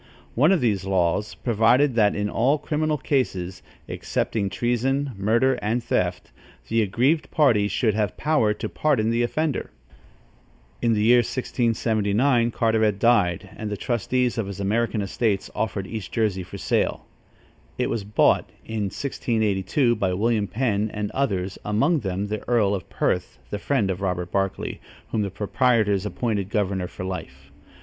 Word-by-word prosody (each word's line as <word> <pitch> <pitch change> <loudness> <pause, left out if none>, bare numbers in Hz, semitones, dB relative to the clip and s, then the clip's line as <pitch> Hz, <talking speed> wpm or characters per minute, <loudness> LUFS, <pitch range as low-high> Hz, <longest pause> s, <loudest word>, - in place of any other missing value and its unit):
One 150 +9 +4
of 190 - +3
these 105 -6 +1
laws 95 +1 0
provided 120 +4 +3
that 105 -3 +3
in 105 0 -1
all 130 +8 +2
criminal 155 +1 -1
cases, 95 -11 -1 0.3
excepting 100 -3 -2
treason, 130 +6 0
murder 115 +6 +2
and 115 +3 -1
theft, - - -1 0.4
the 115 - +2
aggrieved 130 - +1
party 115 -9 +3
should 110 +1 +1
have 105 -2 -1
power 150 -9 +2
to - - -4
pardon 130 -8 +1
the 115 +1 +1
offender. 150 +5 -1 1.1
In 115 -1 +2
the 105 -1 +1
year 120 +2 +6
1679, 115 0 +1
Carteret 110 -3 +1
died, 100 -5 +2
and 110 - -5
the 105 - -3
trustees 120 +2 0
of 105 - -2
his 100 -1 -7
American 110 +2 0
estates 100 0 -1
offered 100 -3 -2
East 110 0 -6
Jersey 105 -5 0
for 90 - -8
sale. - - 0 0.7
It - - 0
was 115 - -2
bought, 105 +2 +2 0.2
in 110 -2 -2
1682, 110 +1 0
by 95 -2 0
William 110 0 +1
Penn 110 -3 0
and 105 -1 -3
others, 95 -9 -1
among 110 +11 +2
them 95 -3 -2
the 105 +1 -4
earl 110 -5 +3
of 95 -3 -4
Perth, - - -1
the 105 - -3
friend 105 -4 0
of 95 +1 -5
Robert 90 -2 -2
Barclay, 95 -1 -2 0.3
whom 110 - 0
the 100 - -1
proprietors 105 0 +1
appointed 105 -4 -2
governor 95 -4 -1
for 95 - -8
life. 70 -7 -7
110 Hz, 155 wpm, -24 LUFS, 100-120 Hz, 1.1 s, year